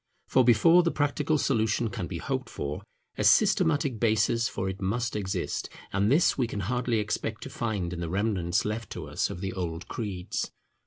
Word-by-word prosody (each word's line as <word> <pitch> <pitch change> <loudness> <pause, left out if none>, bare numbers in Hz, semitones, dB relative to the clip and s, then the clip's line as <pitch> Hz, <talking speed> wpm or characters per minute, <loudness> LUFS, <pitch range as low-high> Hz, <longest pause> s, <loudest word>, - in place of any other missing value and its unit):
For 130 - +4
before 125 +10 +6
the 170 - +1
practical 150 0 +1
solution 110 -4 +1
can 95 -7 -4
be 85 - -5
hoped 130 +9 -3
for, 70 +1 -4 0.4
a - - +1
systematic 140 -6 +3
basis 115 +1 +2
for 95 - -3
it 95 +1 -5
must 115 +5 -1
exist: 95 -3 -2 0.2
and 100 +3 +2
this 165 +5 +4
we 125 - +2
can 105 -3 -4
hardly 120 +3 0
expect 110 +1 -2
to - - -8
find 100 -7 -2
in 85 - -5
the 85 -1 -3
remnants 95 -2 0
left 105 0 -3
to - - -6
us - - -1
of 85 - -6
the 95 -1 -3
old 85 -2 -4
creeds. 100 -6 -4
110 Hz, 190 wpm, -28 LUFS, 95-120 Hz, 0.4 s, before